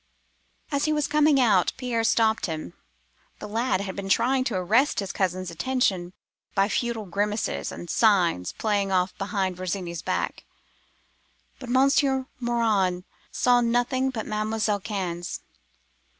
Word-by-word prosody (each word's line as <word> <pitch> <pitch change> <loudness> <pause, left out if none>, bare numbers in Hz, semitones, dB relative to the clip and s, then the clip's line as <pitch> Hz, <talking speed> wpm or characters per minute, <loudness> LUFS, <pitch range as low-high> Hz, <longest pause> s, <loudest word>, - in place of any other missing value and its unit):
"As 280 -1 +1
he 310 - +1
was 300 -1 +1
coming 300 -1 +4
out, 210 -8 +3
Pierre 245 -3 -1
stopped 225 -2 +2
him. 155 - -5 0.6
The - - -8
lad 225 -1 0
had 190 -2 -5
been 195 -1 -5
trying 255 +6 +3
to 235 - -1
arrest 220 +11 +2
his 195 -2 -3
cousin's 185 -1 -2
attention 185 -2 0 0.4
by 195 +1 +3
futile 235 0 -1
grimaces 205 +3 -2
and 175 - -8
signs 175 - +2
played 205 -2 0
off 185 -1 +1
behind 195 -2 -1
Virginie's 180 -2 -4
back: - - -2 1.2
but 255 -3 -8
Monsieur 265 +1 +3
Morin 215 -7 +1 0.3
saw 245 -1 +3
nothing 245 +3 +1
but 230 -4 -4
Mademoiselle 215 -1 -1
Cannes. 185 -4 -4
215 Hz, 135 wpm, -25 LUFS, 185-245 Hz, 1.2 s, coming